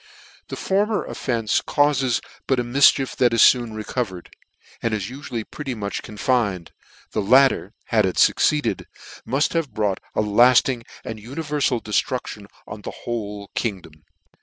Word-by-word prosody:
The -, -, -6 dB
former 205 Hz, +3 st, 0 dB
offence 115 Hz, -4 st, -1 dB
caufes 135 Hz, -4 st, +1 dB, 0.3 s
DUE 135 Hz, -, +3 dB
a 125 Hz, -, -1 dB
mifchief 135 Hz, +2 st, +3 dB
that 120 Hz, -2 st, +3 dB
is 115 Hz, -, +8 dB
foon 120 Hz, -3 st, -5 dB
recovered, 105 Hz, -4 st, -4 dB, 0.5 s
and 115 Hz, -2 st, 0 dB
is 105 Hz, 0 st, -4 dB
ufually 125 Hz, -4 st, -5 dB
pretty 135 Hz, -4 st, -5 dB
much 100 Hz, -2 st, -4 dB
confined; 105 Hz, -5 st, -1 dB, 0.4 s
the -, -, -1 dB
latter, 125 Hz, -2 st, +3 dB
had 110 Hz, -4 st, +2 dB
it 95 Hz, -, -3 dB
fucceed -, -, +4 dB, 0.3 s
cd,. -, -, -2 dB, 0.4 s
mufthave 150 Hz, +3 st, 0 dB
brought 105 Hz, -3 st, -1 dB, 0.2 s
a -, -, +2 dB
lading 120 Hz, +3 st, +4 dB, 0.2 s
and 110 Hz, -1 st, -6 dB
univerfal 140 Hz, +1 st, -2 dB
def 105 Hz, -, +1 dB
truftion 120 Hz, -6 st, -6 dB, 0.2 s
on 105 Hz, 0 st, -9 dB
the -, -, -6 dB, 0.2 s
whole 105 Hz, -4 st, -5 dB
kingdom. 95 Hz, -8 st, -3 dB
120 Hz, 145 wpm, -22 LUFS, 105-135 Hz, 0.5 s, is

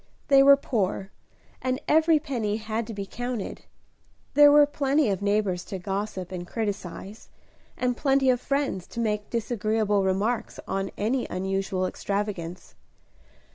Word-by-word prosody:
They 275 Hz, -1 st, +7 dB
were 280 Hz, 0 st, +8 dB
poor, 200 Hz, -6 st, -2 dB, 0.5 s
and 255 Hz, 0 st, -1 dB
every 320 Hz, +1 st, +5 dB
penny 240 Hz, -9 st, -2 dB
had 220 Hz, +1 st, -3 dB
to 230 Hz, -, -6 dB
be 200 Hz, -1 st, -4 dB
counted. 245 Hz, +1 st, -5 dB, 0.7 s
There 290 Hz, 0 st, +8 dB
were 295 Hz, 0 st, +7 dB
plenty 285 Hz, -3 st, +1 dB
of 195 Hz, -, -2 dB
neighbors 200 Hz, -3 st, 0 dB
to 195 Hz, -, -5 dB
gossip 195 Hz, 0 st, -4 dB
and 175 Hz, -1 st, -6 dB
criticise, 205 Hz, -1 st, -5 dB, 0.5 s
and 250 Hz, -1 st, 0 dB
plenty 270 Hz, -1 st, +3 dB
of 250 Hz, -1 st, -1 dB
friends 275 Hz, -11 st, -1 dB
to 235 Hz, -, -7 dB
make 210 Hz, -2 st, -1 dB
disagreeable 215 Hz, -3 st, 0 dB
remarks 205 Hz, +5 st, -1 dB
on 195 Hz, 0 st, -2 dB
any 240 Hz, +5 st, 0 dB
unusual 190 Hz, 0 st, -1 dB
extravagance. 195 Hz, -3 st, -4 dB
215 Hz, 135 wpm, -26 LUFS, 195-255 Hz, 0.7 s, were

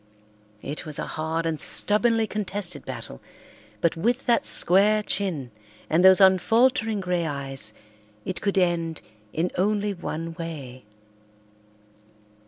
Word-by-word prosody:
It 145 Hz, +2 st, -5 dB
was 150 Hz, -2 st, -7 dB
a -, -, -3 dB
hard 160 Hz, +1 st, -3 dB
and 160 Hz, -2 st, -2 dB
stubbornly 225 Hz, +2 st, +3 dB
contested 200 Hz, -7 st, -4 dB
battle, 60 Hz, -, -8 dB, 0.6 s
but 170 Hz, -, +2 dB
with 235 Hz, +10 st, 0 dB
that 235 Hz, -2 st, +2 dB
square 210 Hz, +4 st, +3 dB
chin 165 Hz, -, -2 dB, 0.4 s
and 165 Hz, +3 st, +3 dB
those 190 Hz, +1 st, +8 dB
unfaltering 220 Hz, +3 st, +3 dB
grey 180 Hz, -2 st, -1 dB
eyes 135 Hz, -6 st, -2 dB, 0.5 s
it 185 Hz, -, -4 dB
could 200 Hz, -1 st, -1 dB
end 170 Hz, -3 st, 0 dB, 0.3 s
in 170 Hz, +3 st, -1 dB
only 205 Hz, +1 st, +1 dB
one 165 Hz, -2 st, -5 dB
way. 135 Hz, -8 st, -7 dB
180 Hz, 120 wpm, -25 LUFS, 160-205 Hz, 0.6 s, those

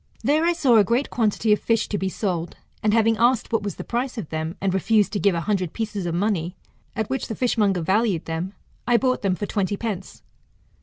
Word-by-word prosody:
There 305 Hz, +3 st, +3 dB
I 345 Hz, -, +3 dB
saw 265 Hz, -8 st, +4 dB
a 210 Hz, -, +7 dB
great 240 Hz, +7 st, 0 dB
quantity 215 Hz, -1 st, +2 dB
of 210 Hz, -, +1 dB
fish 230 Hz, -1 st, +1 dB
to 205 Hz, -, -1 dB
be 190 Hz, -, -1 dB
sold, 175 Hz, -4 st, -3 dB, 0.2 s
and 215 Hz, -, +2 dB
having 225 Hz, 0 st, +3 dB
asked 235 Hz, 0 st, +2 dB
what 225 Hz, -, +2 dB
was 205 Hz, -1 st, -4 dB
the -, -, -6 dB
price 245 Hz, +2 st, -3 dB
of 195 Hz, -9 st, -5 dB
them, 160 Hz, +2 st, -4 dB
and 190 Hz, -1 st, 0 dB
refused 210 Hz, +3 st, +2 dB
to 205 Hz, -, 0 dB
give 200 Hz, -3 st, +3 dB
a 170 Hz, -, -1 dB
hundred 185 Hz, -4 st, -1 dB
pieces 210 Hz, -5 st, -3 dB
of 170 Hz, -, -2 dB
money, 180 Hz, -2 st, -1 dB, 0.4 s
at 220 Hz, -2 st, -1 dB
which 265 Hz, +1 st, -3 dB
the 220 Hz, -, -4 dB
fishmonger 210 Hz, -7 st, +1 dB
valued 190 Hz, 0 st, +1 dB
them, 165 Hz, +4 st, -4 dB, 0.3 s
I 240 Hz, -1 st, +5 dB
bought 255 Hz, +1 st, +1 dB
them 195 Hz, -2 st, +1 dB
for 205 Hz, -, -3 dB
twenty 200 Hz, 0 st, -1 dB
pence. 200 Hz, -5 st, -5 dB
210 Hz, 225 wpm, -23 LUFS, 190-230 Hz, 0.4 s, a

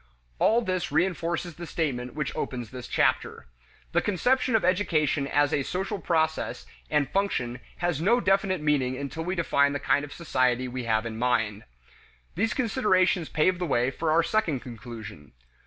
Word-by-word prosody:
All 235 Hz, +2 st, +4 dB
this 185 Hz, -6 st, -2 dB
reinforces 170 Hz, +1 st, 0 dB
the 170 Hz, +1 st, -8 dB
statement 125 Hz, -7 st, -2 dB
which 150 Hz, -4 st, -3 dB
opens 120 Hz, -4 st, -4 dB
this 125 Hz, -1 st, -7 dB
chapter: -, -, 0 dB, 0.5 s
The -, -, +2 dB
conception 245 Hz, +5 st, +1 dB
of 215 Hz, -, +2 dB
education 160 Hz, -6 st, +1 dB
as 145 Hz, 0 st, +2 dB
a 145 Hz, -, +2 dB
social 190 Hz, +7 st, -3 dB
process 160 Hz, -2 st, -1 dB, 0.2 s
and 150 Hz, -3 st, +2 dB
function 130 Hz, -10 st, -1 dB, 0.2 s
has 175 Hz, -4 st, -1 dB
no 230 Hz, +8 st, +4 dB
definite 195 Hz, -4 st, +1 dB
meaning 135 Hz, -4 st, +1 dB
until 140 Hz, +4 st, -4 dB
we 180 Hz, +3 st, -2 dB
define 140 Hz, -4 st, +2 dB
the 145 Hz, -, -2 dB
kind 145 Hz, -, +2 dB
of 145 Hz, -, -8 dB
society 130 Hz, -5 st, 0 dB
we 125 Hz, 0 st, -5 dB
have 110 Hz, 0 st, +1 dB
in 115 Hz, -1 st, -5 dB
mind. 115 Hz, -4 st, 0 dB, 0.7 s
These 220 Hz, +5 st, 0 dB
considerations 190 Hz, -, +2 dB
pave 175 Hz, +4 st, +2 dB
the 175 Hz, -, -1 dB
way 125 Hz, -2 st, +1 dB
for 160 Hz, +4 st, -2 dB
our 165 Hz, +2 st, +4 dB
second 165 Hz, -, 0 dB
conclusion. 110 Hz, -, -9 dB
155 Hz, 165 wpm, -27 LUFS, 125-185 Hz, 0.7 s, All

